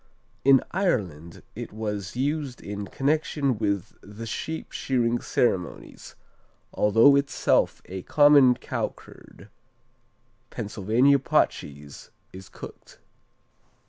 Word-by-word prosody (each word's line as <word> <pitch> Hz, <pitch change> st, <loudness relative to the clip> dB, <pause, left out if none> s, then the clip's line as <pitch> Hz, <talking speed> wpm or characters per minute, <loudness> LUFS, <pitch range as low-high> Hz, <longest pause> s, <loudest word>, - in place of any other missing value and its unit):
In 135 Hz, -1 st, +5 dB
Ireland 90 Hz, -, -2 dB
it -, -, -7 dB
was 105 Hz, -3 st, -5 dB
used 140 Hz, 0 st, -2 dB
in 100 Hz, 0 st, -6 dB
connection 140 Hz, -1 st, 0 dB
with 100 Hz, -4 st, -2 dB
the 105 Hz, +3 st, -9 dB
sheep 160 Hz, +8 st, -5 dB
shearing 120 Hz, -2 st, 0 dB
ceremonies, 95 Hz, -7 st, -2 dB, 0.6 s
although 115 Hz, +7 st, +5 dB
itself 140 Hz, 0 st, +1 dB
a 95 Hz, 0 st, -7 dB
common 145 Hz, 0 st, +5 dB
cow 125 Hz, -, -3 dB
curd. -, -, -16 dB, 1.0 s
Pennsylvania 115 Hz, +8 st, +1 dB
pot 135 Hz, -, +2 dB
cheese 70 Hz, 0 st, -11 dB, 0.2 s
is 95 Hz, 0 st, -11 dB
cooked. -, -, -12 dB
115 Hz, 100 wpm, -25 LUFS, 100-140 Hz, 1.0 s, In